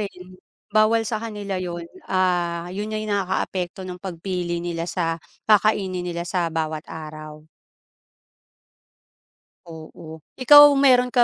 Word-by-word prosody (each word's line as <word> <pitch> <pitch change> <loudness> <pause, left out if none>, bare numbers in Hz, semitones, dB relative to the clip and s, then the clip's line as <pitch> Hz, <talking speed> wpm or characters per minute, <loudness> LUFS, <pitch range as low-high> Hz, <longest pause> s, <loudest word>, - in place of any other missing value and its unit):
rin, 195 -3 -6 0.5
bawal 215 +1 +3
sa 220 0 -3
kanila 205 -4 -5
yun. 175 -2 -5 0.2
Ah, 175 -2 0
yun 205 +3 -4
yung 215 0 -3
nakakaapekto 190 -2 -2
ng 180 -1 -8
pagpili 180 -1 -4
nila 170 0 -4
sa 165 -2 -2 0.3
kakainin 205 -3 +2
nila 170 -1 -4
sa 175 -1 -1
bawat 160 -1 -3
araw. 155 -1 -9 2.2
Oo, 160 -1 -11 0.2
ikaw 290 +3 +9
meron 255 -3 +4
ka 245 -1 +3
180 Hz, 120 wpm, -22 LUFS, 170-210 Hz, 2.2 s, ikaw